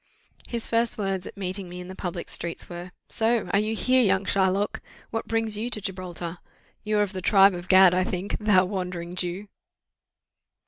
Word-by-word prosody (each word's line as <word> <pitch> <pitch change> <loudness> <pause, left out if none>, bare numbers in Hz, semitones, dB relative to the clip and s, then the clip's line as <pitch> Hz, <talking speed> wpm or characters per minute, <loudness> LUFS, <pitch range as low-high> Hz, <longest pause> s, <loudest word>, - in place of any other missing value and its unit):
"His 235 -2 -2
first 230 0 +2
words 195 -3 -2
at - - -11
meeting 190 -1 -4
me 180 +1 -8
in 180 - -8
the 185 - -7
public 180 -2 -5
streets 170 -1 -3
were, 175 +1 -8 0.2
'So! 230 0 +1
are 200 - +5
you 215 +1 -1
here, 255 +3 +3
young 195 -2 +2
Shylock? 195 +1 +1 0.3
What 225 - -3
brings 225 -2 0
you 230 +3 -2
to 220 - 0
Gibraltar? 180 -3 -6 0.4
You 215 0 0
are 210 - +4
of 205 -1 -4
the 185 - -4
tribe 195 +1 +6
of 175 0 -7
Gad, 185 -1 +7
I 185 +1 +2
think, 185 +2 -3
_thou 195 -4 +4
Wandering 180 -3 -4
Jew! 180 +3 -2
190 Hz, 190 wpm, -26 LUFS, 180-210 Hz, 0.4 s, Gad